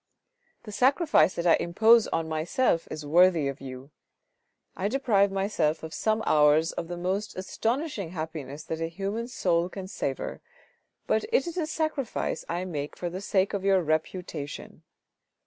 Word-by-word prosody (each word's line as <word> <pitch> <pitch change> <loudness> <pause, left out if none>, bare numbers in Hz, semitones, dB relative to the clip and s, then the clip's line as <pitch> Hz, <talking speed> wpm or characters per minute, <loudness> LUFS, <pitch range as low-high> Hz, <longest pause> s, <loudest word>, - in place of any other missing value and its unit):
" 485 -1 -43
The 215 - -9
sacrifice 260 - +3
that 170 - -3
I 170 - +6
impose 220 +6 +4
on 165 -1 -1
myself 165 +4 0
is 155 -1 -6
worthy 170 -1 +4
of 140 0 -5
you. 130 +1 -9 0.8
I 190 - -1
deprive 210 -5 +2
myself 195 -6 0
of 160 0 -7
some 220 0 0
hours 150 +2 +4
of 165 - -5
the 175 0 -5
most 190 +4 -2
astonishing 225 - -2
happiness 155 -4 -6
that 160 0 -5
a 165 - 0
human 200 +7 -4
soul 175 -8 0
can 190 0 -7
savour, 135 -7 -4 0.6
but - - +1
it 475 - +3
is 340 -1 -5
a 335 -4 -1
sacrifice 310 -5 -2
I 175 +2 -2
make 150 -5 -5
for 175 -1 -4
the 185 +2 -5
sake 195 -1 +1
of 200 -2 -2
your 195 -2 +3
reputation. 155 -1 -3
185 Hz, 165 wpm, -27 LUFS, 160-215 Hz, 0.8 s, I